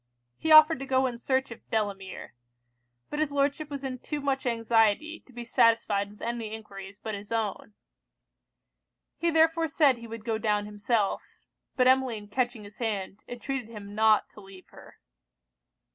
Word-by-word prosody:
He 320 - -1
offered 310 -1 +8
to 275 - -6
go 260 0 +2
in 240 -2 -3
search 260 0 0
of 230 - -12
Delamere; 200 -3 -3 0.8
but 295 - -3
his 310 -2 0
Lordship 285 +2 0
was 280 -1 -6
in 255 -2 -4
too 300 +3 -4
much 275 -2 -1
anxiety 230 +6 +2
to - - -17
be 240 -1 -7
satisfied 215 -3 +2
with 210 - -14
any 230 -2 -3
enquiries 195 -3 -10
but 220 +2 -6
his 205 +1 -8
own. 215 -2 -3 1.4
He 340 - +2
therefore 325 0 +3
said 290 -4 +3
he 235 - -9
would 225 -1 -8
go 225 -2 -1
down 210 -2 0
himself; 210 0 0 0.5
but 255 -1 +4
Emmeline 255 -5 +2
catching 245 0 -1
his 205 0 -13
hand, 205 -4 -3
entreated 245 0 -5
him 205 -3 -9
not 215 0 +4
to 210 - -13
leave 195 -1 -14
her. - - -15
230 Hz, 165 wpm, -28 LUFS, 210-270 Hz, 1.4 s, offered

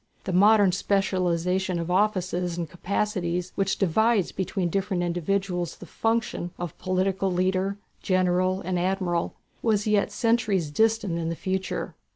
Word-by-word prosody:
The 190 - -3
modern 205 +1 +6
specialization 185 -1 0
of 170 +1 -3
offices 180 -3 0
and 170 -2 -2
capacities 180 -1 -2
which 195 -1 0
divides 210 +2 +2
between 190 -1 -2
different 190 -1 -1
individuals 175 0 -1
the - - -11
functions 225 -6 -1
of 175 -3 -5
political 190 +1 0
leader, 185 +2 0 0.2
general, 185 0 +1
and 185 -1 -1
admiral 180 -2 -1 0.3
was 215 -3 +1
yet 210 -2 +2
centuries 215 -9 +1
distant 220 -2 +1
in 165 -1 -2
the 165 - -2
future. 190 +2 -3
185 Hz, 135 wpm, -26 LUFS, 175-200 Hz, 0.3 s, modern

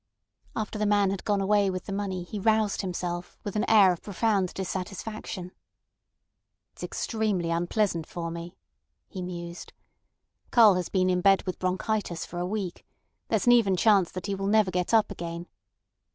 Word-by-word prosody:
After 215 -1 -3
the 210 - +1
man 205 -2 +3
had 195 - -4
gone 205 -2 +1
away 200 0 +3
with 185 -1 -4
the 195 - -5
money 195 -3 -3
he 205 +4 -6
roused 215 0 +2
himself, 175 -2 -4
with 205 - -5
an 210 - 0
air 200 -4 +7
of 175 - -9
profound 200 -2 0
dissatisfaction. 190 0 -5 1.2
"It's - - -15
extremely 210 -7 -1
unpleasant 170 0 0
for 170 -2 -5
me," 170 +1 -8 0.5
he 190 - -7
mused. 175 -1 -7 0.8
"Karl 225 -4 +7
has 180 -2 -2
been 185 -1 +2
in 180 0 +1
bed 195 0 +4
with 185 - -5
bronchitis 185 -1 -1
for 175 - -7
a 175 - -1
week. 195 -3 -4 0.4
There's - - 0
an 245 - +6
even 225 -6 +4
chance 200 -4 +4
that 185 -1 -5
he 200 - -2
will 195 0 -3
never 210 -2 +3
get 180 0 -1
up 225 -2 +4
again. 170 0 -6
190 Hz, 170 wpm, -27 LUFS, 180-210 Hz, 1.2 s, air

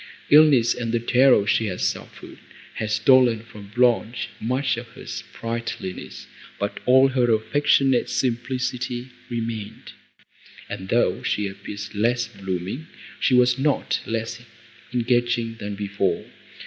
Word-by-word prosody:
Illness 145 -6 +6
and 115 -2 -3
the 120 - +1
terror 125 -2 +4
she 110 +1 +1
had 90 -2 -4
suffered - - -4 0.4
had 110 - -2
stolen 115 +2 +4
from 105 -3 -12
Blanche 120 -1 +2
much 130 +3 0
of 120 +1 -7
her - - -11
sprightliness, 115 -5 -6 0.3
but 100 0 -3
all 130 +2 +6
her 125 -2 +2
affectionate 135 +3 +2
simplicity 125 0 -2 0.2
remained, 115 -3 -5 0.8
and, 95 0 -7
though 120 - +2
she 105 -1 -1
appeared 100 +1 -8
less 120 +3 +1
blooming, 95 - -5 0.3
she 130 - +3
was 125 +1 +4
not 145 +1 +1
less 115 0 -3 0.5
engaging 120 -1 0
than 100 0 -5
before. 100 -1 -1
120 Hz, 120 wpm, -23 LUFS, 105-125 Hz, 0.8 s, Illness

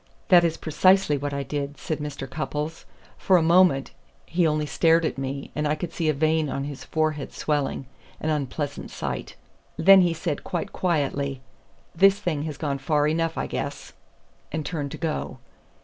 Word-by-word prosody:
"That 175 -3 +7
is 165 -1 0
precisely 185 +1 +3
what 145 +1 -3
I 140 0 -2
did," 145 0 -4
said 155 - -3
Mr. 145 -2 -5
Cupples. 150 +2 -4 0.3
"For 185 - +4
a 165 - +2
moment 165 -5 +4 0.3
he 170 0 +1
only 150 -1 0
stared 165 +2 +3
at 145 - -2
me, 135 +1 -4
and 150 0 -1
I 150 - +1
could 165 +2 -6
see 165 -3 0
a - - +3
vein 155 +1 +1
on 135 +1 -3
his 140 -1 -6
forehead 155 -2 -1
swelling 145 -3 -1 0.3
an 155 - -1
unpleasant 145 0 -3
sight. - - -5 0.4
Then 195 0 +8
he 175 -2 +2
said 165 -2 -3
quite 175 -3 -4
quietly: 140 -6 -1 0.5
'This 195 +3 +5
thing 175 -8 -2
has 150 -3 -5
gone 140 -3 -2
far 145 +2 +1
enough, 165 +1 0
I - - -1
guess,' - - -5 0.6
and 155 -1 -3
turned 145 -3 -3
to - - -5
go." 160 -2 -3
155 Hz, 180 wpm, -25 LUFS, 145-165 Hz, 0.6 s, Then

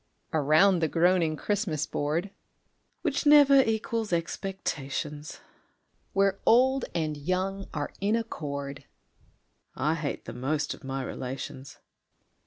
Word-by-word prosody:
_) - - -45 0.3
Around 160 +5 +4
the 160 - +2
groaning 170 0 +2
Christmas 185 -5 -1
board, 160 +7 -2 0.7
(Which 295 -2 0
never 285 -2 +8
equals 225 -2 -1
expectations,) 155 -4 -3 0.7
Where 195 0 +2
old 260 +2 +4
and 155 -3 -1
young 185 +6 -2
are 145 -2 -3
in 205 +3 +2
accord 140 -11 -4 0.9
(_I 150 +4 +1
hate 155 -3 -4
the 115 - -7
most 145 +5 -1
of - - -14
my 135 0 -3
relations! 130 +1 -6
165 Hz, 115 wpm, -28 LUFS, 145-200 Hz, 0.9 s, never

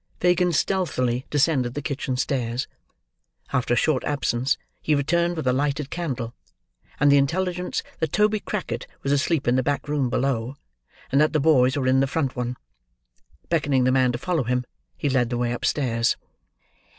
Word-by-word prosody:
Fagin 180 0 +3
stealthily 140 -8 0
descended 135 -4 +1
the 145 - -2
kitchen 135 -2 -2
stairs. 125 -2 -1 0.9
After 125 -2 +1
a - - -1
short 150 -5 +2
absence, 140 -2 0 0.2
he 155 - +2
returned 170 +5 +1
with 155 - -3
a 125 - +3
lighted 140 +1 -1
candle, 130 -9 -3 0.7
and 145 0 +5
the 140 - +6
intelligence 180 +5 -1 0.2
that 160 -2 -1
Toby 210 +1 +2
Crackit 120 - -4 0.2
was 140 - 0
asleep 145 0 +1
in 120 +1 +3
the - - +3
back 145 +3 -1
room 145 -4 0
below, 130 0 -1 0.5
and 140 +2 +4
that 155 - +3
the 155 - +3
boys 135 -3 +4
were 135 - -1
in 130 +1 +4
the 135 - +2
front 135 -2 -1
one. 125 0 -3 0.9
Beckoning 145 -6 +2
the 130 - +3
man 130 -1 +3
to 120 - -3
follow 170 +4 -1
him, 125 +1 0 0.3
he - - -1
led 130 -3 +2
the 120 - -2
way 120 0 0
upstairs. 120 -2 0
135 Hz, 175 wpm, -24 LUFS, 125-155 Hz, 0.9 s, the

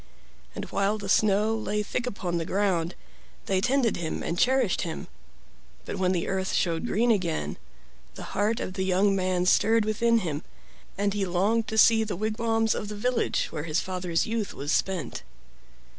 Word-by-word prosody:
And - - -4
while 200 +2 +1
the 205 -2 -6
snow 210 +2 +3
lay 210 -1 -1
thick 245 +4 -3
upon 180 -7 -2
the - - -1
ground 185 -3 0 0.5
they 190 -1 +1
tended 255 -1 +2
him 165 -2 -3
and 170 - -2
cherished 250 0 +2
him; 165 - -5 0.8
but - - -5
when 185 -1 +1
the 175 -2 -1
earth 190 0 -1
showed 165 -2 0
green 235 +4 +2
again 165 - -1 0.6
the - - -8
heart 210 +3 +1
of 185 - -4
the 190 -1 -2
young 190 +2 +2
man 185 -1 0
stirred 220 +3 +4
within 230 +2 +2
him, 155 -5 -3 0.6
and 200 0 +1
he 205 -1 -1
longed 200 +5 +1
to 220 - -3
see 225 0 +6
the 215 - -3
wigwams 225 +2 0
of 210 - -4
the 210 - -6
village 245 +4 0
where 155 -1 -4
his 155 0 0
father's 180 -2 -1
youth 225 -2 -3
was 145 +2 -3
spent. 185 -9 -1
200 Hz, 175 wpm, -27 LUFS, 180-220 Hz, 0.8 s, see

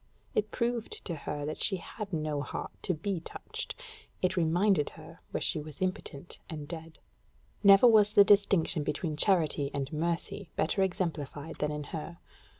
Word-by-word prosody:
It 215 0 +1
proved 235 -1 -2
to 175 - -3
her 145 -1 -4
that 155 - -4
she 195 - +3
had 200 +3 -7
no 155 -3 -1
heart - - -5
to 180 - 0
be 185 +3 -2
touched: 165 - -7 0.5
it 185 0 +2
reminded 175 0 +3
her - - -12
where - - -3
she - - +1
was 150 -1 -9
impotent 180 -4 -4
and 150 -3 -6
dead. 160 0 -8 0.7
Never 200 +3 +8
was 215 -3 +6
the 200 - +9
distinction 200 -6 +4
between 150 +2 -2
charity 155 -5 +2
and 140 +1 -3
mercy 170 +4 -2
better 170 +5 +1
exemplified 160 -5 -2
than 150 - +1
in 150 0 -3
her. 165 +1 -5
165 Hz, 160 wpm, -30 LUFS, 150-195 Hz, 0.7 s, the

